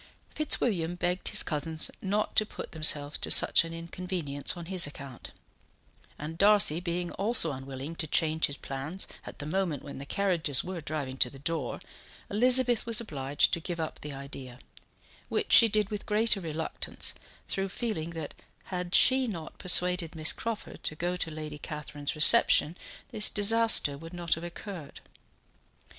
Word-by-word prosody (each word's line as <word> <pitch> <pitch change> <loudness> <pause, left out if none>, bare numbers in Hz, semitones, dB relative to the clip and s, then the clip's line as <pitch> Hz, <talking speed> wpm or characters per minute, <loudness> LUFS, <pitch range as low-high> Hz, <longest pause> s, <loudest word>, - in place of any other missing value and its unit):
Fitzwilliam 190 - 0
begged 180 +1 -1
his - - +5
cousins 155 +1 -1
not 205 +2 -2
to - - +5
put 215 - -9
themselves 150 -2 0
to - - 0
such - - +6
an 165 - -8
inconvenience 165 -3 -5
on 170 - -8
his 180 -3 +1
account; 140 -3 -11 0.9
and 160 +2 -8
Darcy 200 -6 +5
being 175 0 -4
also 200 -5 0
unwilling 135 +3 -8
to 155 - -4
change 160 +1 +1
his 140 - -4
plans 140 +8 -6 0.2
at - - -10
the 145 - -6
moment 165 -3 -2
when 140 - -9
the 140 - -8
carriages 170 -9 0
were 180 -2 -6
driving 145 -4 -5
to 125 - +2
the 135 - -13
door 165 +4 -4 0.5
Elizabeth 245 +2 +4
was 230 -2 +3
obliged 145 - -1
to 170 - 0
give 170 0 -5
up 160 - -5
the 150 - -7
idea, 135 -2 -10 0.7
which - - -1
she 230 - +8
did 215 -2 -1
with 210 -1 -6
greater 215 -1 +2
reluctance 160 -1 -3 0.3
through 195 -1 -3
feeling 185 -7 -4
that 160 -3 -6 0.4
had 180 0 -2
she 260 0 +4
not 165 -8 -8
persuaded 180 -2 +3
Miss 155 -1 +3
Crawford 230 -2 -6
to 155 - -4
go 175 +3 -2
to 180 -2 -2
Lady 155 -1 -7
Catherine's 150 -1 -6
reception, 150 +2 +5 0.3
this 210 - +3
disaster 210 -9 +6
would 165 +2 -11
not 175 -1 0
have 165 - -3
occurred. 175 -3 -9
165 Hz, 160 wpm, -28 LUFS, 150-195 Hz, 0.9 s, she